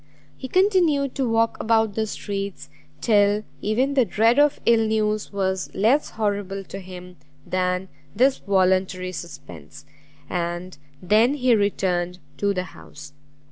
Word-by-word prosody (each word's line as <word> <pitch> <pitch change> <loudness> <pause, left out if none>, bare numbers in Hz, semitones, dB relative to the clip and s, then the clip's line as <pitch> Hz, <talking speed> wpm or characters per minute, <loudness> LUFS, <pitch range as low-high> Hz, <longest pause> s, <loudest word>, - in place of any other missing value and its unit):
He 260 - -7
continued 345 -6 +2
to 265 -4 -1
walk 225 0 +1
about 220 -2 +2
the 220 +1 -1
streets, 200 -7 -5 0.3
till 205 0 +3 0.2
even 250 +7 0
the 265 -2 +4
dread 225 +5 +2
of 295 -1 +3
ill 225 -1 +4
news 215 -1 -1
was 190 -2 -2
less 240 +9 +2
horrible 200 -2 -2
to 195 - -8
him 180 -1 -11 0.3
than 180 0 -1 0.3
this 260 +5 +3
voluntary 185 -1 +1
suspense, 90 - -10 0.4
and 175 +2 -4 0.3
then 220 +9 +3
he 255 -3 +2
returned 180 -4 0 0.2
to 200 0 +1
the 185 -2 -2
house. 80 - -13
205 Hz, 135 wpm, -23 LUFS, 185-230 Hz, 0.4 s, the